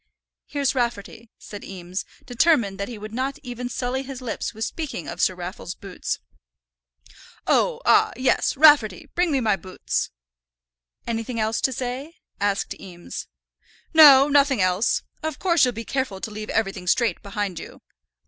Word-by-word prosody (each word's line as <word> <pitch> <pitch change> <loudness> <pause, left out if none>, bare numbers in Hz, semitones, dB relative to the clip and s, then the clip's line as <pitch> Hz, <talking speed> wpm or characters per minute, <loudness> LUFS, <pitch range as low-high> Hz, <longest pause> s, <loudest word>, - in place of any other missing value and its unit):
"Here's 280 -2 0
Rafferty," 235 -2 -3
said 205 - -10
Eames, 185 0 -6 0.2
determined 245 -7 +2
that 200 - -2
he 240 - -7
would 215 +1 -8
not 265 +3 -2
even 245 -1 -5
sully 250 +1 -2
his 270 -1 -7
lips 245 -4 -4
with 220 0 -3
speaking 300 - -5
of - - -5
Sir 185 - +3
Raffle's 180 0 -6
boots. 195 -2 -4 1.3
"Oh, - - +2
ah, - - +5
yes; 260 +1 +1
Rafferty, 275 - +5
bring 355 -1 +1
me 275 - +2
my 215 -4 +2
boots." 185 0 -3 1.0
"Anything 230 +1 -3
else 220 +1 0
to 265 - +2
say?" 260 +6 -5 0.2
asked 200 0 0
Eames. 175 -2 -8 0.7
"No, 285 -4 +9
nothing 280 -3 +3
else. 185 +4 +2 0.2
Of 315 -2 -3
course 340 -5 +3
you'll 250 - 0
be 230 0 -7
careful 260 -8 -2
to 220 - -5
leave 215 0 -7
everything 195 -4 -1
straight 225 -1 +2
behind 200 -3 -3
you." - - -10
230 Hz, 155 wpm, -24 LUFS, 200-270 Hz, 1.3 s, No